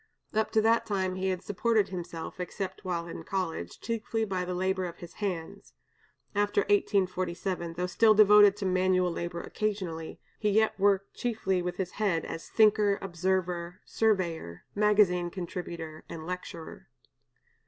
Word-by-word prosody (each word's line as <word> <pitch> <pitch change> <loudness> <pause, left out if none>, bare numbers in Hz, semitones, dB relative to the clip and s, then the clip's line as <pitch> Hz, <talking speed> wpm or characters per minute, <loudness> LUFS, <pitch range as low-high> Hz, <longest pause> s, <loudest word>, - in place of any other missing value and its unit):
Up 220 0 +1
to 220 - +5
that 230 +1 +3
time 190 -3 0
he 185 +1 -2
had 185 -1 -2
supported 215 0 +1
himself, 175 -2 -6
except 185 +1 -5
while 175 -2 -2
in 170 - -7
college, 165 - -3
chiefly 225 -1 -2
by 190 -3 -2
the 180 0 -3
labor 190 +1 0
of 170 - -6
his 175 -1 -10
hands; 180 -5 -4 0.6
after 205 0 +2
1847, 185 -3 0
though 180 +2 -2
still 215 +4 +4
devoted 205 -1 +7
to 205 - -3
manual 185 -1 +2
labor 170 0 -4
occasionally, 185 -7 -3 0.2
he 210 - +1
yet 220 +2 +3
worked 195 0 +2
chiefly 205 -6 -1
with 175 0 -3
his 185 -2 -2
head 195 -7 0
as 165 - -7
thinker, 210 -2 +4
observer, 180 -1 -2
surveyor, 170 - 0
magazine 205 -4 +3
contributor, 170 -3 -6
and 160 -1 -7
lecturer. 180 -2 -7
185 Hz, 145 wpm, -29 LUFS, 175-205 Hz, 0.6 s, devoted